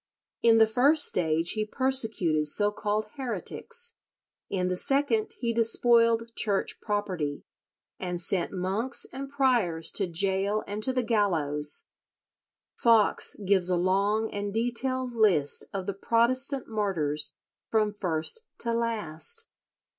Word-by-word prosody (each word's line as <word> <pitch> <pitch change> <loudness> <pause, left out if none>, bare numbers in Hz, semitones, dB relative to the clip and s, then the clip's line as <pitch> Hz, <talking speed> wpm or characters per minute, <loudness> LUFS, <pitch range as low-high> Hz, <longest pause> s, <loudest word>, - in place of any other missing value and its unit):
In 230 -1 +5
the 220 - +7
first 270 +8 +4
stage 165 -1 +1
he 215 0 -1
persecuted 215 - 0
so 205 +7 +3
called 210 0 -2
heretics, 470 - -4 0.6
in 185 -2 -1
the 180 - -1
second 245 0 +1
he 235 -2 0
despoiled 230 0 +3
Church 200 -3 -1
property, 185 -9 -3 0.6
and 180 -1 -4
sent 175 0 -1
monks 195 +7 -2
and 270 +1 -6
priors 240 - 0
to 195 - -1
gaol 195 +4 0
and 205 +1 -5
to 260 - 0
the 255 -1 0
gallows. 160 -10 0 0.9
Foxe 230 -3 +3
gives 190 -2 +4
a 180 - +2
long 200 +5 +1
and 205 0 -3
detailed 245 +3 -2
list 185 -11 +3
of 195 -2 -4
the 200 - -2
Protestant 255 +6 +2
martyrs 165 -9 -2 0.3
from 215 -2 +1
first 175 - -2 0.2
to 235 - -1
last. 230 - 0
210 Hz, 125 wpm, -27 LUFS, 185-235 Hz, 0.9 s, the